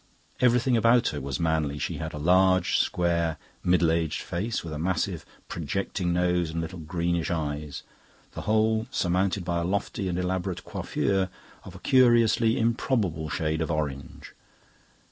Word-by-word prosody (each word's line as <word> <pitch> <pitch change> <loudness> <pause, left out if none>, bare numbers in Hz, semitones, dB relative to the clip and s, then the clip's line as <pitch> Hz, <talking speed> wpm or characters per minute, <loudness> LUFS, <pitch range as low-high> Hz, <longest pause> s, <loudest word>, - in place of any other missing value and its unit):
Everything 125 0 +3
about 115 +2 +4
her 75 - -5
was 70 -1 -4
manly. 80 -3 0
She - - -3
had - - -4
a - - -7
large, 95 +3 +3
square, 85 -2 +1 0.3
middle 85 -2 +3
aged 80 -1 -1
face, 105 +7 -3
with 80 -2 -6
a 75 - -5
massive 90 +1 -1 0.2
projecting 85 +2 -2
nose 90 -1 +1
and 80 +1 -3
little 85 +2 -5
greenish 85 +1 -1
eyes, 75 -3 -3 0.5
the - - -6
whole 110 +1 +1
surmounted 95 -3 0
by 85 -1 0
a - - -1
lofty 95 +1 -2
and 90 - -2
elaborate 90 0 -2
coiffure 95 -1 -1 0.4
of - - -10
a - - -10
curiously 115 -3 +4
improbable 110 - 0
shade 80 +1 -1
of 80 - -1
orange. 75 -4 -4
90 Hz, 150 wpm, -27 LUFS, 80-100 Hz, 0.5 s, about